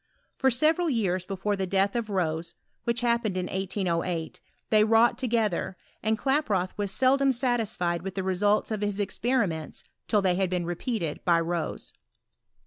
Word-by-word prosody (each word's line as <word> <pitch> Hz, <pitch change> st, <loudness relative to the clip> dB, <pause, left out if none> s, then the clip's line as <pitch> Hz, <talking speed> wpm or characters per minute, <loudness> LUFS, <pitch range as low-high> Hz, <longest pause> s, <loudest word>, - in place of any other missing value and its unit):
For 265 Hz, -, +3 dB
several 315 Hz, +7 st, +2 dB
years 190 Hz, -8 st, 0 dB
before 200 Hz, +1 st, -1 dB
the 190 Hz, -1 st, -2 dB
death 195 Hz, +2 st, +1 dB
of 230 Hz, -2 st, -2 dB
Rose 170 Hz, -4 st, -2 dB, 0.3 s
(which 235 Hz, +1 st, 0 dB
hap 235 Hz, 0 st, +2 dB
pened 200 Hz, -4 st, -2 dB
in 180 Hz, -, -1 dB
1808) 180 Hz, -3 st, -2 dB, 0.3 s
they 215 Hz, -1 st, +6 dB
wrought 225 Hz, +2 st, +4 dB
together, 220 Hz, -7 st, 0 dB, 0.2 s
and 220 Hz, 0 st, +1 dB
Klaproth 220 Hz, -10 st, +1 dB
was 205 Hz, -2 st, -2 dB
seldom 270 Hz, +4 st, +3 dB
satisfied 225 Hz, -, -1 dB
with 190 Hz, +1 st, -6 dB
the 190 Hz, -, -2 dB
results 205 Hz, +4 st, +1 dB
of 215 Hz, -1 st, -2 dB
his 205 Hz, -1 st, -1 dB
experi 230 Hz, +3 st, +1 dB
ments 160 Hz, -2 st, -6 dB, 0.2 s
till 210 Hz, -2 st, +2 dB
they 185 Hz, -2 st, +3 dB
had 190 Hz, -2 st, +1 dB
been 180 Hz, -1 st, -1 dB
repeated 175 Hz, -, -3 dB
by 170 Hz, -2 st, +4 dB
Rose. 165 Hz, 0 st, -3 dB
200 Hz, 165 wpm, -27 LUFS, 180-235 Hz, 0.3 s, they